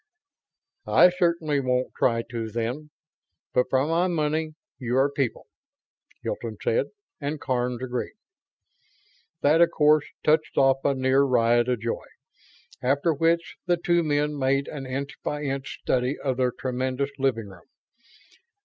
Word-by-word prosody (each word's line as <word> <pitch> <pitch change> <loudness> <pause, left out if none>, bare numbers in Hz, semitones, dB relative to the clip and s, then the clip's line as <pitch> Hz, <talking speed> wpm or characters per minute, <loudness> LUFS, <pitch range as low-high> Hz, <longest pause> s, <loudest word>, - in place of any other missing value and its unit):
"I 180 - +6
certainly 170 -5 +1
won't 125 -1 0
try 115 -2 +1
to, 115 -2 -3
then. 120 +7 -3 0.6
But 125 - +2
for 130 +1 +2
my 165 +3 +1
money, 155 -2 -1 0.2
you 125 -1 -1
are 135 +2 +3
people," 135 -4 -2 0.8
Hilton - - -4
said, 480 +1 +1 0.3
and 145 0 -3
Karns 125 -2 -2
agreed. 125 - -4 1.3
That, 155 +4 +4
of 170 - +6
course, 150 -2 +4 0.2
touched 155 0 +2
off 135 0 +4
a 140 - +2
near 130 +1 +3
riot 120 -2 +3
of 125 -4 0
joy; 115 0 -3 0.7
after 140 +6 +2
which 165 +3 0
the 175 -1 +3
two 175 0 +2
men 150 -1 0
made 135 +1 +1
an 135 -3 -6
inch 135 +2 -5
by 150 0 -3
inch 135 -1 -4
study 125 +2 0
of 130 -3 -2
their 125 -1 +2
tremendous 130 +2 -2
living 115 -6 0
room. 90 -3 -16
135 Hz, 140 wpm, -25 LUFS, 125-155 Hz, 1.3 s, I